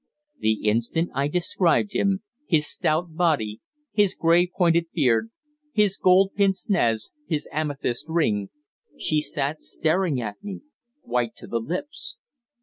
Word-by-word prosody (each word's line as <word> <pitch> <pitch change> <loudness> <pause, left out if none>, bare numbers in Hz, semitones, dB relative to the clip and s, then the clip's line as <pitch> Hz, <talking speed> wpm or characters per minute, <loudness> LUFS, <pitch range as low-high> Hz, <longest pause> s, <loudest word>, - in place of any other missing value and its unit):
The 110 - 0
instant 120 +10 +1
I 140 +2 +1
described 180 +4 +1
him 195 +1 +1 0.2
his 155 -4 +3
stout 160 +3 0
body, 145 -12 +1 0.3
his 205 -3 +3
grey 170 +2 +4
pointed 170 -2 +2
beard, 135 - +2 0.4
his 210 -3 +3
gold 190 +1 +4
pince 195 -2 +1
nez, 115 - +1 0.2
his 150 -3 -2
amethyst 145 -3 -2
ring 110 - +1 0.5
she 155 -1 +1
sat 150 +1 -2
staring 160 -3 0
at 105 -3 -6
me, 200 -2 -6 0.4
white 120 -2 -1
to - - -11
the 115 - -2
lips. 185 - -5
165 Hz, 135 wpm, -24 LUFS, 125-185 Hz, 0.5 s, grey